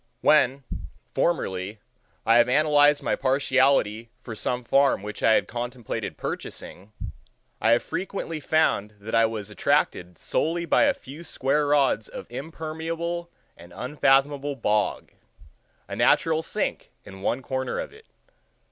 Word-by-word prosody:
When, 135 +2 +4 0.5
formerly, 100 - -1 0.5
I 115 - +5
have 120 +1 +5
analyzed 150 +1 +4
my - - +1
partiality 130 -4 +2
for 120 - -8
some 125 +3 -2
farm 135 -3 +3
which 105 0 -7
I 110 - +5
had - - +2
contemplated 120 -1 -5
purchasing, 100 +4 -6 0.7
I 110 - +3
have 120 - +2
frequently 165 -1 -4
found 130 -9 +1
that 105 +2 -8
I 115 0 +5
was 105 -2 -6
attracted 90 -2 0
solely 170 +2 -1
by 170 - +4
a 285 -1 +2
few 160 - -11
square 145 -1 0
rods 140 -6 +2
of - - -8
impermeable 165 +4 -4 0.3
and 85 +1 -15
unfathomable 140 +1 +1
bog—a 105 -4 -4
natural 160 -1 +3
sink 160 - -2 0.2
in 95 -1 -11
one 125 +6 -1
corner 130 0 -3
of - - -5
it. 445 +1 -17
135 Hz, 130 wpm, -25 LUFS, 110-155 Hz, 0.7 s, I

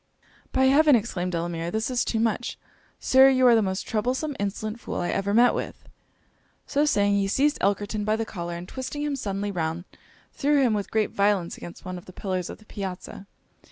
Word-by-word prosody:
'By 265 - +2
heaven!' 290 +2 +6
exclaimed 195 -6 -1
Delamere, 170 0 -2
'this 220 +6 -2
is 245 -1 +1
too 225 - -1
much! 230 +1 -1 0.4
Sir, 265 +1 +6
you 260 -1 +3
are 245 - +7
the 225 - +5
most 190 -1 -2
troublesome, 255 +7 -1
insolent 215 +3 -3
fool, 250 - -6
I 175 - -1
ever 200 +1 -1
met 240 +3 +5
with!' - - -5 0.8
So 290 +2 +1
saying, 205 -8 +2
he 195 - +1
seized 285 +8 +1
Elkerton 205 +2 0
by 215 +1 +1
the 225 0 -2
collar, 175 -5 -5
and 175 +1 -7
twisting 265 +5 -5
him 295 -1 -1
suddenly 205 -5 -3
round, 165 -1 -2 0.5
threw 290 0 +2
him 240 -4 +3
with 205 -2 -2
great 220 -1 0
violence 200 -4 +1
against 175 - -11
one 185 0 -5
of - - -17
the 185 - -12
pillars 185 -2 -3
of - - -7
the 215 - -20
piazza. 195 -1 -7
210 Hz, 200 wpm, -25 LUFS, 190-250 Hz, 0.8 s, are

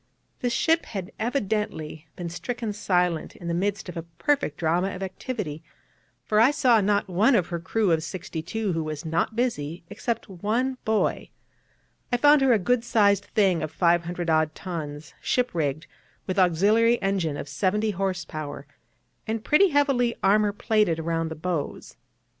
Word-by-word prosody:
This 245 - -1
ship 325 +7 +2
had 195 -2 -5
evidently 210 - -2
been 175 - -5
stricken 225 +5 -4
silent 180 -5 0
in 175 - -9
the 170 - -1
midst 200 +4 -1
of 180 - -7
a 165 - -3
perfect 170 - -1
drama 175 +4 0
of 190 - -5
activity, 190 - -5 0.6
for 215 - +2
I 230 +4 +7
saw 250 -6 +4
not 205 0 +1
one 205 +8 +3
of 185 -6 +1
her 170 - -3
crew 200 +3 0
of 160 -1 +2
sixty 170 -1 -5
two 200 +3 -2
who 165 -1 -1
was 155 0 -5
not 165 +7 0
busy, 175 - -2
except 230 +3 -3
one 225 +8 -1
boy. 220 -1 0 0.8
I 245 - +3
found 290 +3 +6
her 270 -1 +4
a 230 - +5
good 230 +5 +1
sized 200 -4 +3
thing 190 -6 +2
of 155 - -2
500 175 0 +1
odd 155 -1 +2
tons, 150 -6 -6
ship 250 0 +1
rigged, 155 -2 -1 0.4
with 185 0 -1
auxiliary 210 +7 +4
engine 185 -7 -1
of - - -6
seventy 205 +9 0
horse 190 -2 -2
power, 145 -2 -6 0.6
and 220 0 -2
pretty 380 +7 +5
heavily 275 -5 +2
armour 205 +1 +4
plated 210 -4 +1
round 165 0 -1
the 160 - -5
bows. 160 -2 -4
190 Hz, 165 wpm, -25 LUFS, 165-225 Hz, 0.8 s, I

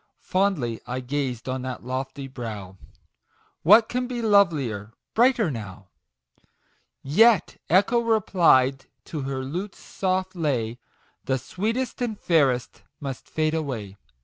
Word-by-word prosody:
Fondly 180 - 0
I 125 +1 -3
gazed 130 -2 -3
on 130 0 -2
that 130 -2 -6
lofty 130 +2 -4
brow 110 -7 -7 0.4
" - - -51 0.3
What 215 +6 +7
can 250 0 -2
be 240 -2 -4
lovelier 145 - +2 0.2
brighter 235 - +3
now 100 -5 -8 0.6
?" - - -44 0.2
Yet 230 -5 +4
Echo 200 +7 +4
replied 175 - +3 0.2
to 155 - -5
her 135 -1 -3
lute's 180 +9 -5
soft 185 0 -2
lay, 130 -9 -1
;t 120 - -20 0.5
The 130 - +1
sweetest 225 - -3
and 225 -4 -2
fairest 135 -7 +1 0.2
must 135 -3 -6
fade 155 0 0
away 125 -11 -3
145 Hz, 130 wpm, -25 LUFS, 125-200 Hz, 0.6 s, What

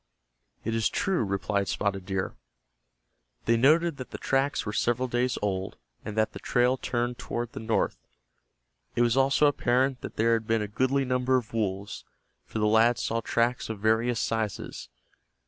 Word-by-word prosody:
"It 115 - -2
is 115 -1 +2
true," 190 -9 0
replied 100 0 -1
Spotted 95 -2 -2
Deer. 95 -1 -2 1.1
They 115 - +4
noted 155 +6 +4
that 130 - -7
the - - -6
tracks 135 +1 0
were 105 - -3
several 120 +3 +1
days 125 +1 0
old, 95 -2 -2 0.3
and 105 0 -6
that 110 0 +1
the - - -7
trail 125 +1 +2
turned 120 -1 -2
toward 120 -1 -4
the - - -7
north. 110 0 0 1.0
It 120 - +3
was 120 0 +2
also 135 +2 +4
apparent 130 -2 +2
that - - -7
there 115 +1 +3
had 115 -1 -1
been 115 -1 +1
a - - -3
goodly 130 +6 +1
number 125 0 +2
of 120 -3 -5
wolves, 100 -3 -2 0.4
for - - -5
the 105 - +1
lads 110 +3 +4
saw 115 +1 -1
tracks 120 +2 0
of 110 - -3
various 110 +2 +2
sizes. 110 -2 -3
115 Hz, 170 wpm, -27 LUFS, 110-125 Hz, 1.1 s, They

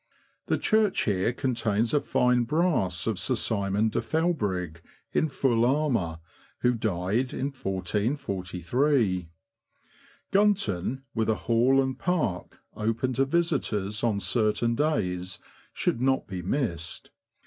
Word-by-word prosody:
The - - +2
church" 215 -3 +2
here 100 +2 +1
contains 115 -4 0
a 145 - +3
fine 125 -1 +2
brass 150 - +1
of 110 -5 -1
Sir 125 +8 0
Simon 105 -1 0
de - - -1
Felbrigg, 100 - -1 0.3
in 155 - +2
full 125 -4 +1
armour, 120 - +1 0.4
who 125 0 +3
died 110 +3 -1
1443. 100 - -1 1.0
Gunton, 135 - +1
with 110 -1 0
a 110 - +3
Hall 120 +4 +4
and 130 -1 -1
Park, 160 - -1 0.2
open 115 +4 -1
to 135 +3 +2
visitors 135 - -1
on 110 -4 +1
certain 110 +2 +1
days, 95 - -1 0.3
should 120 - -1
not 130 0 +2
be 95 -2 -5
missed. 90 - -2
115 Hz, 115 wpm, -27 LUFS, 95-135 Hz, 1.0 s, Hall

